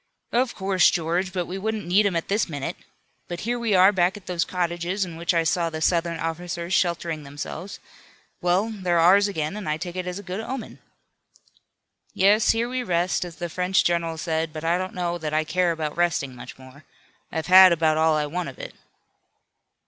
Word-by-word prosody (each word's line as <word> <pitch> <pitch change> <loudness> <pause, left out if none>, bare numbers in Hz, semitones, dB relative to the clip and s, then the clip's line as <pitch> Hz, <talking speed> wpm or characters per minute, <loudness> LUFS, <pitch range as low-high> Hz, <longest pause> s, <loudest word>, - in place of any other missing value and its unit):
"Of 245 +1 +1
course, 190 -1 +3
George, 175 +3 -1
but 180 -2 -2
we 185 +3 -6
wouldn't 220 +1 -3
need 195 +4 +3
him 190 - -2
at 165 - -2
this 205 -1 0
minute. 145 -3 -4 0.5
But 175 0 -6
here 240 +2 -2
we 225 -4 +1
are 185 +2 +7
back 185 0 +1
at 205 - -14
those 175 -1 -1
cottages 180 +2 -2
in 170 -2 -9
which 170 +1 -1
I 165 -2 +2
saw 165 +1 +1
the 160 -1 -5
Southern 170 0 0
officers 170 +2 -4
sheltering 170 -3 0
themselves. 145 +6 -7 0.6
Well, 185 +5 +1
they're 185 -5 -1
ours 190 +5 +5
again 160 -3 -3
and 210 -7 -5
I 155 - 0
take 175 +1 -6
it 185 -1 -4
as 180 0 -4
a 200 - -8
good 185 +2 -5
omen." 235 +1 -6 1.4
"Yes, 205 +3 +4
here 230 +1 +2
we 255 +1 -2
rest, 180 -5 0
as 175 -2 -8
the 175 0 -4
French 180 +3 +1
general 170 -1 0
said, 160 0 -2
but 155 0 -7
I 170 +2 +1
don't 185 0 -5
know 175 -1 -2
that 155 -1 -3
I 155 - +2
care 175 +3 +1
about 155 -2 -3
resting 170 -6 0
much 120 - -11
more. 130 +3 -15 0.5
I've 160 -1 -3
had 185 0 +9
about 160 -2 +2
all 160 0 +3
I 150 - 0
want 170 +2 -4
of 130 - -12
it." - - -8
175 Hz, 205 wpm, -24 LUFS, 165-190 Hz, 1.4 s, had